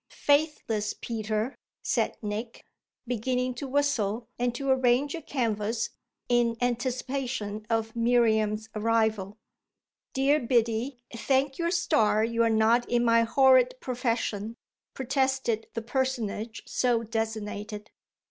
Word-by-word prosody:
"Faithless 285 -8 0
Peter!" 220 +2 -2 0.3
said - - 0
Nick, 215 +3 -5 0.4
beginning 250 +2 -1
to 260 +3 -6
whistle 250 -6 0
and 245 0 0
to 275 +2 -4
arrange 260 +2 +2
a 335 - -5
canvas 225 -5 -1 0.4
in 240 -1 +2
anticipation 245 -3 -2
of 225 0 -1
Miriam's 220 -2 +2
arrival. 220 -2 0 0.8
"Dear 275 +3 +3
Biddy, 240 +1 0
thank 270 +4 0
your 335 0 +1
stars 225 - +2
you're 230 0 +2
not 225 +2 +3
in 240 0 +2
my 230 0 +5
horrid 255 +1 +4
profession," 230 -3 -2 0.4
protested 265 -3 0
the 230 - -3
personage 235 -3 -2
so 240 -2 +1
designated. 215 -1 -4
235 Hz, 110 wpm, -27 LUFS, 220-260 Hz, 0.8 s, my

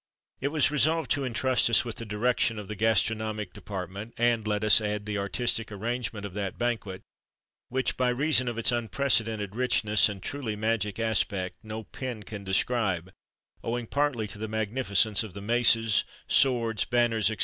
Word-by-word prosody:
It 135 - -1
was 145 -1 +2
resolved 155 +2 +1
to 140 - +1
intrust 130 -1 +2
us 115 - +5
with 115 - -6
the 115 - -6
direction 115 +1 +1
of 105 -2 -6
the 105 - -5
gastronomic 110 -1 0
department, 100 +3 -7
and, 120 -2 +2
let 105 0 0
us 105 +1 +7
add, 105 -1 -2
the 105 -1 -2
artistic 115 +2 -1
arrangement 115 0 -3
of 100 - -7
that 100 -2 -4
banquet, 110 -6 -2 0.7
which, 130 +1 -1
by 125 -1 +2
reason 130 +1 +2
of 120 -1 -3
its 115 - +2
unprecedented 115 -4 +1
richness 110 -4 +2
and 100 -2 -7
truly 130 -7 -3
magic 105 -1 -1
aspect, 100 -5 -1
no 110 0 -6
pen 120 -2 -6
can 100 +1 -8
describe, 95 -2 0 0.5
owing 120 +1 -2
partly 140 -3 0
to 105 - -8
the 110 - -3
magnificence 110 -1 +1
of 105 -5 -7
the - - -5
maces, 115 0 +3 0.2
swords, 120 -5 +2
banners, 120 -3 +2
&c. 110 0 -1
110 Hz, 170 wpm, -28 LUFS, 105-120 Hz, 0.7 s, us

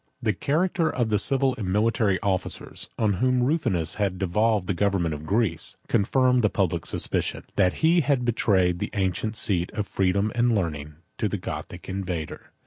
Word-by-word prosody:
] - - -47
The 110 -2 +2
character 165 - 0
of 120 -3 -1
the 105 -1 +2
civil 135 +4 +3
and 95 -4 -2
military 105 -1 +2
officers, 95 -2 -3
on 110 -2 +2
whom 125 -1 +2
Rufinus 125 - 0
had 95 -2 0
devolved 105 +2 +1
the 95 - -1
government 90 -3 0
of 75 +1 -7
Greece, 100 -5 0
confirmed 125 +4 +2
the 105 - +3
public 90 -5 -1
suspicion, - - -2
that 95 - +2
he 170 +1 +5
had 135 -4 +1
betrayed 95 -7 +2
the 105 - -3
ancient 100 +3 -1
seat 90 -5 +1
of 105 -1 -2
freedom 100 +2 0
and 120 -1 +2
learning 75 -6 -3 0.2
to 110 - +1
the 105 - -2
Gothic 85 0 -7
invader. 90 -5 -5
100 Hz, 175 wpm, -25 LUFS, 90-120 Hz, 0.2 s, he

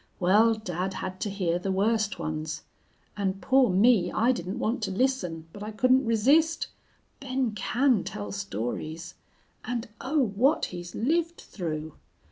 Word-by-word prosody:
Well, 210 +5 +5
dad 190 -2 -3
had 185 0 -5
to 210 - -2
hear 180 -4 -1
the 190 +2 -2
worst 215 +2 +1
ones. 155 -1 -4 0.5
And 195 -1 -1
poor 260 +1 +4
me, 195 -1 +4
I 235 +3 +3
didn't 185 -4 -4
want 230 +3 -1
to 210 - -1
listen, 190 -8 -1
but 205 - -10
I 210 - -4
couldn't 255 +4 +3
resist. 285 +9 +3 0.5
Ben 260 -3 -1
can 240 +2 +1
tell 105 -1 -6
stories. 120 - -4 0.5
And 240 -1 -3
oh, 285 +1 +1
what 250 +10 +2
he's 175 0 -7
lived 335 +7 0
through! 155 -4 -5
205 Hz, 145 wpm, -27 LUFS, 175-250 Hz, 0.5 s, Well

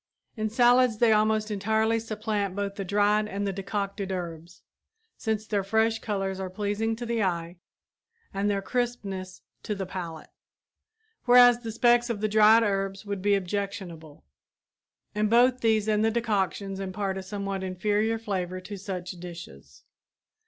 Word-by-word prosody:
In 215 -1 -2
salads 245 0 +4
they 235 0 +4
almost 215 0 +2
entirely 220 +2 +1
supplant 215 -3 -3
both 200 -1 -2
the 200 - -5
dried 205 +2 +2
and 200 0 -3
the 195 - -1
decocted 200 0 -3
herbs, 170 -2 -6 0.5
since 220 -1 -2
their 205 -2 -1
fresh 220 +3 +1
colors 195 -3 -3
are 190 -1 -4
pleasing 205 +3 -2
to 240 +2 -6
the 230 -1 -1
eye 170 -2 -2 0.8
and 200 +1 0
their 200 -1 -1
crispness 200 -7 -3 0.2
to 210 - -3
the 195 -1 -4
palate; 170 -4 -7 0.9
whereas 245 -1 +7
the 230 -2 -6
specks 240 +2 +3
of 230 -3 -2
the 215 - 0
dried 215 +2 +6
herbs 195 -1 -2
would 200 -2 -4
be 205 +1 +3
objectionable, 185 -5 -5 0.9
and 210 0 0
both 245 +2 +4
these 220 -2 +2
and 215 0 +2
the 225 - +3
decoctions 200 -3 -1
impart 195 0 -3
a - - -5
somewhat 195 0 -4
inferior 210 +4 0
flavor 185 -5 -3
to 200 +2 -8
such 185 -2 -5
dishes. 120 - -11
205 Hz, 150 wpm, -27 LUFS, 190-220 Hz, 0.9 s, whereas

